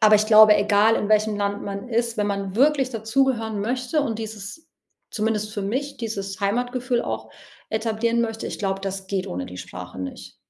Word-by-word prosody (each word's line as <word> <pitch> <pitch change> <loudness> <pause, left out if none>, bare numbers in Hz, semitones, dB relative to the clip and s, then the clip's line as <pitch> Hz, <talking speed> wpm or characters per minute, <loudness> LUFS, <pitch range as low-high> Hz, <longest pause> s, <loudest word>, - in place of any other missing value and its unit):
aber 215 -1 +7
ich 215 +1 +1
glaube, 215 -1 +8
egal 205 +2 +4
in 205 - -2
welchem 215 0 +3
Land 205 0 -1
man 200 +3 -5
ist, 235 0 0
wenn 210 -1 +1
man 200 -1 -3
wirklich 275 -1 +3
dazugehören 225 -1 0
möchte 250 +7 0
und 225 -6 -2
dieses 220 +9 -8 0.4
zumindest 215 -1 -1
für 205 -2 -3
mich, 265 +8 -2
dieses 200 -4 -5
Heimatgefühl 245 +4 0
auch 110 0 -4 0.4
etablieren 225 +1 0
möchte, 225 -1 -2
ich - - -5
glaube, 195 -1 -1
das 195 0 -4
geht 195 -1 -1
ohne 90 +1 -4
die 90 - -9
Sprache 90 +1 -8
nicht. 90 0 -7
215 Hz, 185 wpm, -23 LUFS, 200-235 Hz, 0.4 s, glaube